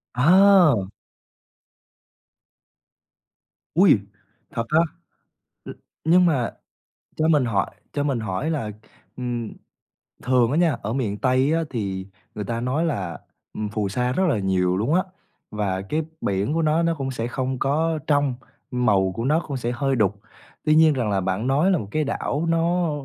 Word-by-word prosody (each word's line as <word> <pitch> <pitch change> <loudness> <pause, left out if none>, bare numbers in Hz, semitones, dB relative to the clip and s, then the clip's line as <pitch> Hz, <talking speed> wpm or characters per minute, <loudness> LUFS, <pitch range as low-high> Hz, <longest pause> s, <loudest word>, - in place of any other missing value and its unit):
À! 170 - +5 2.9
Ôi, 180 - +6 0.5
thật 115 - -2
á? 155 +1 +4 0.9
Ư, - - -7 0.3
nhưng 175 +2 +5
mà 135 -8 +1 0.7
cho 160 +1 +1
mình 150 -5 +4
hỏi 105 -5 0 0.2
cho 145 - -1
mình 135 -5 -1
hỏi 110 +10 -2
là, 135 -9 -2 0.5
ừm, 120 -3 -4 0.7
thường 125 -1 +3
á 150 - +1
nha, 170 -2 +4
ở 110 +3 -3
miền 110 -6 -2
Tây 130 +4 +2
á, 165 0 +1
thì 95 -5 -4 0.3
người 105 - -3
ta 115 0 -3
nói 135 +7 0
là, 95 - -3 0.4
ừm, 105 -1 -4
phù 105 -2 -2
sa 125 +3 -1
rất 190 - +1
là 110 - +1
nhiều 95 -1 +1
luôn 120 +10 0
á, 185 - +4 0.5
và 100 -3 -2
cái 150 +11 -2 0.2
biển 100 +8 -1
của 165 - +1
nó, 160 +1 +2
nó 165 0 +2
cũng 135 -2 -3
sẽ 120 -2 -3
không 130 +1 -3
có 155 +3 0
trong, 145 -4 +2 0.4
màu 105 -7 +2
của 115 - -3
nó 155 +4 +3
cũng 140 -2 -3
sẽ 120 0 -2
hơi 135 +2 0
đục. 100 -3 +1 0.5
Tuy 155 0 +4
nhiên 160 -1 +6
rằng 120 -5 -1
là 100 -1 +1
bạn 95 +6 -2
nói 150 +8 +3
là 180 - +3
một 100 - -5
cái 155 0 0
đảo 145 +2 -2
nó 170 0 +1
130 Hz, 165 wpm, -23 LUFS, 105-155 Hz, 2.9 s, Ôi